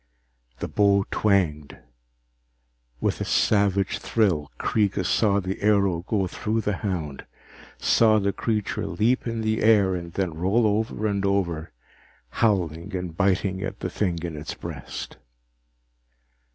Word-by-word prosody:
The - - -4
bow 100 -1 +3
twanged. 85 -9 +1 1.2
With - - -1
a - - +1
savage 100 -2 +2
thrill, 90 -10 +1
Kreega 100 -3 0
saw 100 +2 +2
the 95 0 -4
arrow 100 -5 +2
go 100 -4 +1
through 110 +5 -2
the 105 -3 -1
hound, 85 -9 -4 0.5
saw 110 -2 +4
the 100 -1 0
creature 105 -1 -2
leap 120 +6 +1
in 115 -1 -2
the 110 0 0
air 105 -4 +4
and 85 -1 -5
then 95 -4 -1
roll 95 +8 +1
over 110 +1 0
and 100 -2 0
over, 90 -5 -1 0.6
howling 95 - 0
and 90 -3 -4
biting 95 0 +1
at 95 +1 -5
the - - -3
thing 90 -5 -1
in 85 -3 -4
its 75 +1 -6
breast. - - -7
100 Hz, 135 wpm, -25 LUFS, 90-105 Hz, 1.2 s, saw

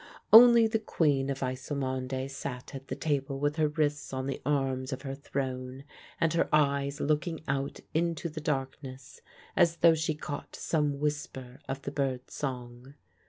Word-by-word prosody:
Only 235 0 +10
the 220 0 +1
Queen 145 -9 +1
of 135 0 -2
Ysselmonde 130 0 -3
sat 125 -2 -6
at 135 0 -8
the - - -3
table 140 -3 -1
with 145 +2 0
her 155 -1 +3
wrists 150 -1 -1
on 130 0 -2
the 135 - -4
arms 135 -2 0
of 130 0 -5
her 135 -1 -4
throne 130 -1 -4 0.4
and 165 -1 +2
her 170 - +1
eyes 140 -1 +2
looking 155 +3 0
out 135 +1 -2
into 170 0 0
the 155 -1 -6
darkness, 135 - -4 0.3
as 170 -2 +4
though 170 0 +6
she 155 -1 -1
caught 145 -1 -6
some 150 -3 0
whisper 140 -3 -4
of 135 0 -4
the 140 - -4
bird's 135 -3 -2
song. 125 0 -6
140 Hz, 165 wpm, -29 LUFS, 130-155 Hz, 0.4 s, Only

